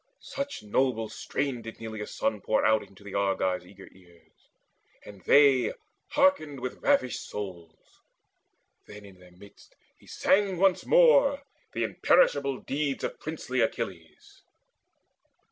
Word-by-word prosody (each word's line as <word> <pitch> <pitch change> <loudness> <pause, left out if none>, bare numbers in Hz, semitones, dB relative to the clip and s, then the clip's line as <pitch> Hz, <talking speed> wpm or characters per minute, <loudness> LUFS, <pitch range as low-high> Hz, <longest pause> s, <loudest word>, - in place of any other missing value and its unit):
Such 280 - -5
noble 115 0 0
strain 130 +3 -3
did 115 0 -10
Neleus' 110 -2 -7
son 105 - -1
pour 110 - +1
out 110 0 +4
Into 100 +1 -16
the 100 -1 -10
Argives' 95 -2 -1
eager 95 0 -14
ears; 90 -2 -24 0.6
and 100 -2 -12
they 140 -3 +5 0.4
Hearkened 280 - +2
with 125 0 -6
ravished 125 -1 +1
souls. 85 -5 -9 0.9
Then 105 0 -12
in 95 -2 -15
their 90 0 -17
midst 100 +1 -18 0.2
He - - -22
sang 195 -1 +1
once 190 0 +2
more 470 - +5 0.3
the - - -1
imperishable - - +2
deeds 140 0 -3
Of - - -4
princely 140 -5 -3
Achilles. 85 -7 -5
115 Hz, 130 wpm, -27 LUFS, 100-150 Hz, 0.9 s, they